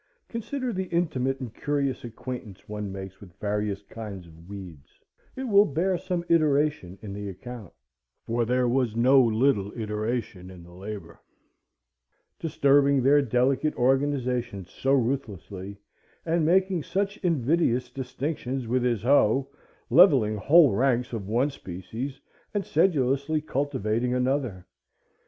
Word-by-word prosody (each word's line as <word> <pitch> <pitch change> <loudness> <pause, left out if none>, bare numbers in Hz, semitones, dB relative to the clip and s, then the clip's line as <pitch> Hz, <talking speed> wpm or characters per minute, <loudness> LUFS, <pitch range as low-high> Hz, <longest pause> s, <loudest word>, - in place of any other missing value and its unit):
Consider 245 +2 -3
the 190 -1 -2
intimate 135 -6 0
and 125 -5 -6
curious 140 -2 -2
acquaintance 120 -3 -8
one 105 -1 -5
makes 95 0 -8
with 90 -4 -14
various 105 -1 -2
kinds 100 -4 -8
of 85 +2 -16
weeds,—it 95 - -11
will 205 -5 +5
bear 175 +6 0
some 175 -1 -3
iteration 150 - +2
in 100 -2 -6
the 100 0 -5
account, 110 +1 -9 0.5
for 115 +1 0
there 125 +2 +1
was 120 -2 +1
no 130 +3 +6
little 110 -3 +2
iteration 105 -3 -3
in 90 -2 -12
the 85 +1 -15
labor,—disturbing 105 - -2
their 145 +2 +5
delicate 130 +4 +1
organizations 125 -6 0
so 135 - -1
ruthlessly, 105 -7 -2 0.5
and 165 0 +1
making 185 0 +3
such 200 +6 -2
invidious 140 -6 +1
distinctions 130 0 -4
with 125 +2 +1
his 120 -4 0
hoe, 135 0 +3 0.4
levelling 135 - +6
whole 145 - +6
ranks 125 +2 +1
of 105 -4 -4
one 125 +7 +1
species, 115 +7 -7 0.4
and 200 - 0
sedulously 145 -2 +2
cultivating 125 -5 -1
another. 125 -7 -1
125 Hz, 125 wpm, -26 LUFS, 105-145 Hz, 0.5 s, no